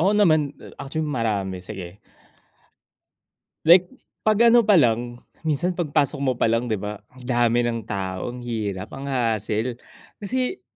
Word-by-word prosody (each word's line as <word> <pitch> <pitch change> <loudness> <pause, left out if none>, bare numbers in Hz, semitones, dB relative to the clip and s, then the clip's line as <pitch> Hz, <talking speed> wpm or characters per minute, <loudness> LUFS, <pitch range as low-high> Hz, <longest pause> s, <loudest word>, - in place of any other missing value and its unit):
Oo 190 +5 +3
naman, 155 -9 +3 0.2
actually 155 +3 -3
marami, 105 -9 -2
sige. 95 -1 -8 1.7
Like, 175 +2 +7 0.3
'pag 215 -1 +2
ano 240 0 +6
pa 205 -3 +5
lang, 120 -2 +1 0.2
minsan 165 +3 0
'pag 170 -4 -3
pasok 140 0 +1
mo 130 -2 +2
'pa - - +3
lang 115 +1 0
'di 110 - 0
ba, 105 +1 -6
ang 130 -1 -15
dami 120 -1 +2
ng 115 -1 -2
tao, 95 +2 -3
ang 125 - -8
hirap, 105 -5 -4
ang 140 +1 -5
hassle. 115 -1 -1 0.5
Kasi, 255 - -2
120 Hz, 150 wpm, -23 LUFS, 110-155 Hz, 1.7 s, Like